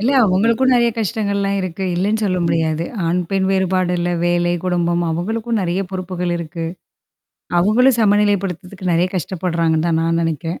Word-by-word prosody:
இல்ல 240 +6 +1
அவங்களுக்கும் 230 +7 +2
நெறைய 235 -1 +3
கஷ்டங்கள்லாம் 200 -2 -1
இருக்கு. 185 +1 -4
இல்லன்னு 205 +5 0
சொல்ல 185 -2 0
முடியாது. 160 -1 0 0.2
ஆண், 170 +2 +1
பெண் 195 -1 +1
வேறுபாடுல 185 -2 0
வேலை, 175 0 +1
குடும்பம் 175 -1 0
அவங்களுக்கும் 220 +7 -2
நெறைய 180 0 -1
பொறுப்புகள் 180 -2 -3
இருக்கு. 170 0 -5 0.9
அவங்களும் 235 +7 +4
சமநிலைப்படுத்துறதுக்கு 200 -3 0
நெறைய 170 +2 +2
கஷ்டப்படுறாங்கன்னு 170 -2 -1
தான் 165 -1 +1
நான் 165 0 +1
நெனைக்கிறேன். 165 +1 -3
185 Hz, 135 wpm, -19 LUFS, 170-200 Hz, 0.9 s, அவங்களும்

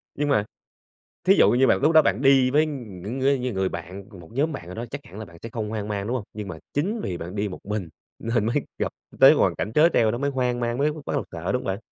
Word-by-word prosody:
Nhưng 145 0 -1
mà 105 -7 +2 0.8
thí 185 +3 +6
dụ - - +6
như 130 +2 +4
bạn - - +4
lúc 150 +3 +4
đó 160 -1 +7
bạn 140 - 0
đi 135 -2 +5
với 150 +3 +4
những 115 - -6
ngươi 135 0 +2
những 125 -1 -2
người 95 0 0
bạn, 90 +4 -7 0.2
một 85 - -13
nhóm 145 +7 0
bạn 135 - -7
nào 90 - -8
đó, 115 +2 -4
chắc 140 - -5
hẳn 95 +5 -11
là 110 - -6
bạn 85 -3 -15
sẽ 115 - -6
không 110 -2 -4
hoang 105 -1 -4
mang, 100 -1 -3
đúng 120 - -1
hông? 125 - -2
Nhưng 105 -1 -6
mà 95 - -6 0.2
chính 195 +11 -1
vì 90 - -3
bạn 85 +4 -7
đi 105 0 -1
một 95 - -7
mình 105 -4 -3 0.3
nên 115 -1 0
mới 115 - -1 0.2
gặp - - -1 0.3
tới - - +9
hoàn - - +2
cảnh 105 - -3
trớ 155 +5 +6
trêu 110 -2 +3
đó 120 - -2
mới 140 +3 0
hoang 125 -2 0
mang, 120 0 -1
mới 145 +3 +2
b - - -8
bắt - - -3
đầu - - 0
sợ, 85 +2 -3
đúng 125 - 0
hông - - -6
bạn? 95 +1 -2
115 Hz, 295 wpm, -24 LUFS, 100-135 Hz, 0.8 s, tới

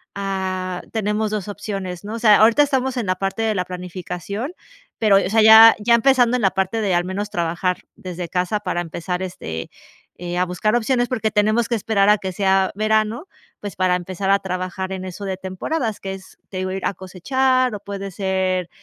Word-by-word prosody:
ah, 185 -2 -3
tenemos 215 0 -1
2 210 -2 -3
opciones, 195 -3 -5
¿no? 210 - -5
O - - -5
sea, 215 -3 +6
ahorita 230 +6 +5
estamos 265 -2 0
en 230 -5 -2
la 185 - +1
parte 195 +4 -3
de 220 -1 0
la 180 -2 -1
planificación, 180 - -6 0.5
pero, 210 -3 +5
o 190 - +1
sea, 220 +1 +3
ya 220 +1 +9
ya 235 +3 +4
empezando 250 0 +3
en 230 - -4
la 195 - +4
parte 190 +4 -1
de 195 -3 0
al 175 - +2
menos 200 +3 -4
trabajar 175 0 -1 0.2
desde 180 -2 -7
casa 180 +3 -1
para 180 -3 -2
empezar, 175 +2 -4
este, 80 - -6 0.5
eh, 175 0 -5
a 180 - +2
buscar 180 +5 0
opciones, 245 +1 0
porque 225 -4 0
tenemos 215 +2 +2
que 240 - 0
esperar 205 -2 +1
a 210 - +6
que 190 -1 -5
sea 190 0 +2
verano, 215 - 0 0.3
pues 205 -1 -7
para 185 -1 +2
empezar 185 +2 -4
a 200 - +4
trabajar 185 0 -4
en 185 - -5
eso 185 +2 -7
de 190 -1 -2
temporadas, 210 - -3
que 195 0 -5
es, 190 -1 -12
te - - -11
digo, 185 0 -2
ir 190 0 -4
a - - 0
cosechar 255 +7 0
o 205 - -6
puede 200 -1 -6
ser 185 -2 -1
195 Hz, 205 wpm, -21 LUFS, 185-220 Hz, 0.5 s, ya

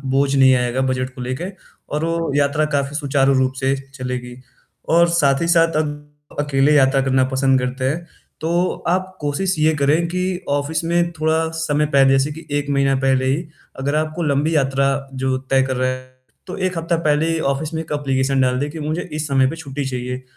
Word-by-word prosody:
बोझ 140 0 +2
नहीं 130 -1 +6
आएगा 125 +1 0
बजट 130 0 -2
को 125 - -7
लेके 130 +7 -3 0.5
और 155 +2 -1
वो 165 -2 -1
यात्रा 145 +2 +2
काफ़ी 140 +1 -1
सुचारू 140 -2 +2
रूप 130 0 +1
से 135 0 +1 0.2
चलेगी। 125 -2 -5 0.5
और 170 +1 +5
साथ 140 -5 +2
ही 165 - 0
साथ 165 -1 +3
अग 145 0 -9
अकेले 145 0 +2
यात्रा 135 -1 +4
करना 130 -1 +2
पसंद 130 0 +2
करते 125 +1 -3
हैं, 170 +4 -3 0.4
तो 170 +3 +1 0.2
आप 185 +1 -1
कोशिश 170 +6 -1
ये 155 +1 +3
करें 150 +4 +2
कि 180 +1 -1 0.3
ऑफिस 145 +3 -1
में 170 0 +1
थोड़ा 160 +1 +1
समय 150 -1 +1
पहले 135 -2 +4
जैसे 135 +2 +2
कि 160 - -11
1 145 - -5
महीना 140 -1 +2
पहले 130 -1 +2
ही, 145 +5 0 0.3
अगर 140 +2 -1
आपको 155 +2 -1
लंबी 150 +2 +1
यात्रा 135 -1 +2 0.3
जो 130 0 -1
तय 135 0 +4
कर 130 0 -2
रहा 130 0 +1
है 130 0 -6 0.4
तो 185 - -6
1 185 -2 -1
हफ्ता 165 +1 0
पहले 150 +2 +2
ही 165 - -1
ऑफिस 155 +3 -5
में 160 - -2
1 160 - -10
एप्लीकेशन 135 -1 0
डाल 125 0 +1
दें 145 - -2
कि 160 - -7
मुझे 155 +4 -2
इस 155 0 -3
समय 135 -1 +3
पर 165 - -5
छुट्टी 140 -3 -5
चाहिए। 125 0 -4
145 Hz, 205 wpm, -20 LUFS, 135-160 Hz, 0.5 s, नहीं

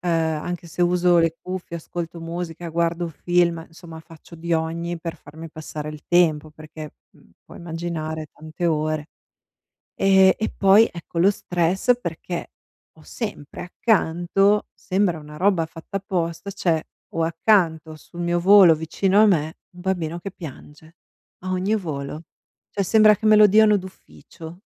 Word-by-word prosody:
Ehm, 175 - -2 0.3
anche 175 -1 -5
se 170 - -7
uso 175 0 +3
le 165 -1 +2
cuffie, 185 -2 -6
ascolto 170 0 -6
musica, 170 0 -6
guardo 170 +1 -1
film, 170 0 0
insomma 165 -1 -12
faccio 165 +1 -15
di 170 +1 -4
ogni 165 +1 -2
per 165 0 -5
farmi 160 +3 -11
passare 150 -1 -7
il 150 -1 -9
tempo 160 -3 +2
perché, 155 0 -11 0.2
mhmm, - - -24
puoi - - -13
immaginare 160 -2 -5
tante 155 +3 -5
ore. 155 -1 -1 0.9
Ehm, 190 -1 +5
e 220 - -2
poi 200 +3 +6
ecco 170 0 -6
lo 190 - +5
stress 185 +7 0
perché 170 -1 -6 0.5
ho 155 - -17
sempre 205 - -7
accanto, 195 0 +1
sembra 185 -4 -1
una 150 0 -11
roba 185 -3 +2
fatta 165 +4 -7
apposta, 180 -2 -3
cioè 165 -4 0 0.3
ho 165 - 0
accanto 165 -2 +1
sul 170 +3 -10
mio 175 0 0
volo 185 -2 +7
vicino 185 +6 +1
a 220 - +7
me 160 -5 +1 0.2
un 180 - -11
bambino 175 -3 -2
che 195 +3 -7
piange. 155 0 -12 0.5
A 185 - -3
ogni 185 +4 0
volo, 150 -4 -5 0.5
cioè 200 - -1
sembra 215 +2 +5
che 215 +2 -2
me 215 - +7
lo 210 0 +8
diano 210 +1 +5
d'ufficio. 180 -2 -12
170 Hz, 155 wpm, -22 LUFS, 160-185 Hz, 0.9 s, lo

